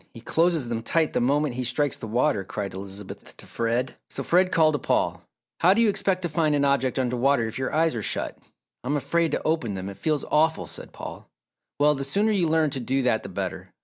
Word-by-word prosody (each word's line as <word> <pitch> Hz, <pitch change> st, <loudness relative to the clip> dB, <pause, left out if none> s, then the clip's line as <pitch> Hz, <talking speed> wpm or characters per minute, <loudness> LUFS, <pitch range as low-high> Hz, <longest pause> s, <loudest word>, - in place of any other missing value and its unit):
He -, -, -8 dB
closes 165 Hz, 0 st, +1 dB
them 115 Hz, -1 st, -2 dB
tight 160 Hz, +6 st, +1 dB
the -, -, +1 dB
moment 140 Hz, +2 st, +1 dB
he 125 Hz, +1 st, -3 dB
strikes 125 Hz, +3 st, 0 dB
the -, -, -7 dB
water," 105 Hz, -3 st, +1 dB
cried 100 Hz, +1 st, -5 dB
Elizabeth 95 Hz, +1 st, -8 dB
to -, -, -11 dB
Fred. 120 Hz, +3 st, -2 dB
So 135 Hz, -, -5 dB
Fred 180 Hz, +5 st, +3 dB
called 155 Hz, -1 st, +4 dB
to 145 Hz, -, 0 dB
Paul, -, -, 0 dB, 0.4 s
"How 185 Hz, +3 st, +5 dB
do 230 Hz, -, +3 dB
you 220 Hz, -, +4 dB
expect 190 Hz, -2 st, 0 dB
to -, -, +1 dB
find 155 Hz, -1 st, +1 dB
an 140 Hz, -1 st, +2 dB
object 140 Hz, -2 st, +1 dB
under 125 Hz, -1 st, 0 dB
water 125 Hz, -1 st, +2 dB
if 110 Hz, +3 st, -6 dB
your 130 Hz, -, -2 dB
eyes 160 Hz, +1 st, +2 dB
are 115 Hz, -, -3 dB
shut?" -, -, -1 dB, 0.5 s
"I'm 145 Hz, +4 st, 0 dB
afraid 160 Hz, +5 st, +1 dB
to -, -, -1 dB
open 155 Hz, -10 st, 0 dB
them, 95 Hz, +1 st, -5 dB
it 100 Hz, -, -9 dB
feels 155 Hz, -3 st, -1 dB
awful," 160 Hz, +1 st, +2 dB
said -, -, -8 dB
Paul. -, -, -9 dB, 0.5 s
"Well, 150 Hz, +1 st, +5 dB
the 135 Hz, -1 st, -3 dB
sooner 205 Hz, +11 st, +1 dB
you 185 Hz, -5 st, +2 dB
learn 155 Hz, -2 st, +2 dB
to 135 Hz, -, -3 dB
do 130 Hz, +2 st, 0 dB
that 115 Hz, -3 st, +2 dB
the -, -, -8 dB
better. -, -, -5 dB
140 Hz, 235 wpm, -25 LUFS, 120-160 Hz, 0.5 s, How